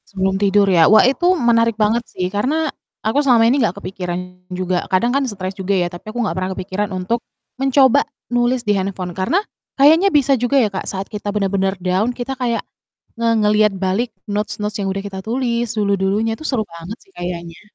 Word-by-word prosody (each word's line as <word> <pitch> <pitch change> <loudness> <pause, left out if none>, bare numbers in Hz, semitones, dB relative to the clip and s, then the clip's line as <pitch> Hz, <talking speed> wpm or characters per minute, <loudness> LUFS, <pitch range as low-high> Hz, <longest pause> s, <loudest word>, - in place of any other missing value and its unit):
Sebelum 190 -1 -1
tidur 200 0 +4
ya. 170 -4 +5
Wah 215 +2 +7
itu 275 +7 +1
menarik 230 -4 +2
banget 220 +2 +2
sih 180 - -3
karena 295 +10 0 0.4
aku 220 +6 +2
selama 245 -5 +4
ini 265 +4 +3
nggak 220 - 0
kepikiran 180 -3 -4 0.3
juga 180 0 -1
kadang 235 +7 +2
kan 280 - +2
stres 190 -2 -5
juga 195 0 -1
ya, 175 -1 +1
tapi 175 +5 -9
aku 230 +3 -5
nggak - - -2
pernah 185 0 -2
kepikiran 195 +2 -3
untuk 185 +6 -1 0.4
mencoba 270 0 +5 0.3
nulis 240 0 +1
di 210 - +3
handphone. 190 -2 -3
Karena 190 - +1 0.4
kayaknya 320 +8 +6
bisa 280 -3 +3
juga 245 +4 +1
ya, 220 - +2
Kak, 190 - -4
saat 195 0 -4
kita 205 -1 -5
bener-bener 195 -1 0
down 185 +6 +1
kita 255 +2 -4
kayak 240 -3 -1 0.6
nge 230 0 +2
ngelihat 210 0 +3
balik 195 +6 0 0.2
notes-notes 210 0 -3
yang 195 - -1
udah 195 +1 -3
kita 195 -1 -6
tulis 235 +2 -1
dulu-dulunya 200 +1 +1
itu 310 - -10
seru 250 -5 0
banget 170 +3 -9
sih 390 - -28
kayaknya. 170 - -6
210 Hz, 190 wpm, -19 LUFS, 190-240 Hz, 0.6 s, Wah